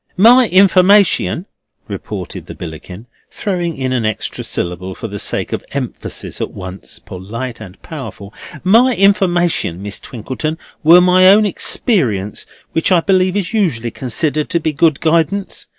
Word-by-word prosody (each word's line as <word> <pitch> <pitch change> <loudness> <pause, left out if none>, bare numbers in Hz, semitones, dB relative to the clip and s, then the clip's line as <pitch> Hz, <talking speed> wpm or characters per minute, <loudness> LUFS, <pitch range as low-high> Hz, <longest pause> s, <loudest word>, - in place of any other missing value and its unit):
"My 240 +5 +6
informiation," 190 -1 +4 0.4
retorted - - -7
the - - -8
Billickin, 90 +5 -9 0.2
throwing 175 -5 -3
in 130 -1 -2
an 125 -3 0
extra 110 -1 -3
syllable 90 +2 -3
for 115 - -6
the 100 -1 -6
sake - - -1
of - - -3
emphasis - - -5
at - - -2
once 95 +1 -7
polite 115 +6 -7
and 95 -4 -11
powerful—"my 190 - -1
informiation, 175 - +2
Miss 100 +1 -4
Twinkleton, 130 +7 -5 0.2
were 170 +3 +7
my 185 +1 +5
own 210 +2 +6
experience, 125 - -1 0.2
which 160 +3 0
I 175 -2 +5
believe 185 +1 +2
is 200 +1 -3
usually 135 - 0
considered 145 +5 -2
to 170 - +1
be 155 -1 -2
good 155 0 +2
guidance. 170 +4 0
160 Hz, 140 wpm, -16 LUFS, -, 0.4 s, were